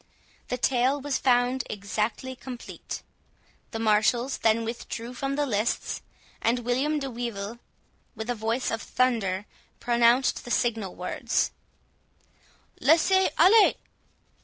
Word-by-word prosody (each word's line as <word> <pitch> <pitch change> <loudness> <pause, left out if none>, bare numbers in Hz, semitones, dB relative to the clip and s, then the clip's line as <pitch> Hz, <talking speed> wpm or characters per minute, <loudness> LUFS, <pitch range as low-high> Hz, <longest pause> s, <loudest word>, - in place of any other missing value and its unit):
The 250 - -2
tale 255 +2 +2
was 285 0 -2
found 250 0 +2
exactly 215 +5 -3
complete. 250 -1 -8 0.7
The 225 - -5
marshals 225 +4 +2
then 225 +1 +2
withdrew 235 +1 -5
from 275 +2 -2
the 290 0 +1
lists, 220 -3 -1 0.4
and 235 +2 +2
William 270 +5 +1
de 275 -2 -3
Wyvil, 230 -2 -5 0.6
with 220 0 -6
a 245 - 0
voice 225 +3 -1
of 225 - -2
thunder, 210 -7 0 0.3
pronounced 240 +2 +3
the - - -9
signal 225 -6 0
words—"Laissez 330 - -1
aller!" 400 +6 +7
240 Hz, 110 wpm, -27 LUFS, 225-260 Hz, 0.7 s, aller